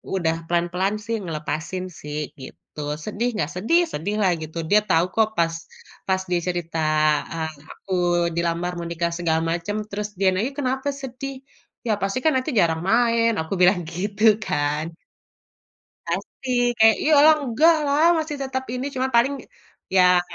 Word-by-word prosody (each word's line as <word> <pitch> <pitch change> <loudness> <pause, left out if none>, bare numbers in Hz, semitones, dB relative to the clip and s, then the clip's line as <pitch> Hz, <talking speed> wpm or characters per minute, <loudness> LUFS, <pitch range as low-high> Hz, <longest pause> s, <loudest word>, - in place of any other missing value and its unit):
udah 165 -3 +1
pelan-pelan 175 +4 0
sih, 230 +2 -3
ngelepasin 155 +2 -4
sih, 150 -3 -7 0.2
gitu. 130 +3 -12 0.2
Sedih 215 +7 -2
nggak? 150 -8 0
Sedih 280 - +3
sedih 200 +8 -2
lah 190 - +3
gitu, 155 +1 -7
dia 210 - +6
tahu 165 +2 +4
kok, 220 -1 +4
pas 165 0 +2 0.5
pas 190 -1 +2
dia 175 - +2
cerita, 170 -2 -3 0.5
eee, 160 -1 -3 0.2
aku 190 - -7 0.4
dilamar 170 +1 -1
menikah 170 0 -2
segala 165 -2 0
macem, 175 +5 -3
terus 210 +1 -3
dia 195 - +3
nanya, 225 +8 -1
"Kenapa 265 0 -1
sedih?" 270 +1 -6 0.5
"Ya 225 - +2
pasti 195 +6 -1
kan 315 - +4
nanti 260 +4 0
jarang 160 -2 +2
main!" 230 0 +3
Aku 160 - -5
bilang 180 +1 +5
gitu 200 +4 -4 0.2
kan. 150 +2 -1 1.1
Pasti, 245 -2 -1
kayak, 220 0 +6
"Ya 305 - +2
elah, 310 +2 +7
enggak 295 +6 +4
lah, 285 +3 +3
masih 310 -2 -3
tetep 260 -1 -3
ini, 255 +2 -3
cuma 260 +1 0
paling, 270 +4 +3 0.6
ya 180 -1 +6
195 Hz, 155 wpm, -23 LUFS, 170-245 Hz, 1.1 s, elah